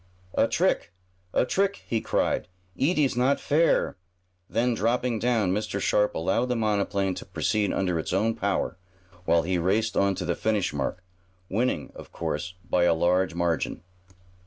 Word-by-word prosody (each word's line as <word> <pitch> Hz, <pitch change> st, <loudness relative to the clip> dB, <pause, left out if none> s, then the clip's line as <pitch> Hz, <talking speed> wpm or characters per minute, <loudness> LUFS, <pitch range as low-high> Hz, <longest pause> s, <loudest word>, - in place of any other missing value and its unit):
"A -, -, +3 dB
trick! -, -, +1 dB, 0.4 s
A -, -, +2 dB
trick!" 200 Hz, +6 st, 0 dB
he 115 Hz, -2 st, 0 dB
cried. -, -, 0 dB, 0.3 s
"Eet 155 Hz, -, +1 dB
is 140 Hz, -5 st, +2 dB
not 130 Hz, +3 st, +2 dB
fair!" 160 Hz, +3 st, +2 dB, 0.5 s
Then, 120 Hz, +2 st, +1 dB
dropping 115 Hz, +1 st, 0 dB
down, 110 Hz, -6 st, +1 dB
Mr. 100 Hz, -1 st, -2 dB
Sharp 105 Hz, +1 st, +2 dB
allowed 95 Hz, +9 st, +1 dB
the 125 Hz, -, +1 dB
monoplane 100 Hz, -3 st, 0 dB
to -, -, -7 dB
proceed 105 Hz, -2 st, 0 dB
under 90 Hz, -3 st, 0 dB
its -, -, -4 dB
own 105 Hz, +5 st, +2 dB
power, 100 Hz, -4 st, -1 dB, 0.5 s
while 85 Hz, -1 st, +3 dB
he 90 Hz, +1 st, 0 dB
raced 105 Hz, +6 st, +1 dB
on 100 Hz, -1 st, +2 dB
to 90 Hz, -, -4 dB
the 85 Hz, -, +1 dB
finish 105 Hz, -3 st, 0 dB
mark, 75 Hz, +6 st, -3 dB, 0.5 s
winning, 120 Hz, +6 st, -1 dB
of -, -, -12 dB
course, 90 Hz, +5 st, -4 dB
by 90 Hz, -1 st, +3 dB
a 85 Hz, -, +4 dB
large 90 Hz, +1 st, +2 dB
margin. 85 Hz, -1 st, -1 dB
100 Hz, 160 wpm, -26 LUFS, 90-115 Hz, 0.5 s, a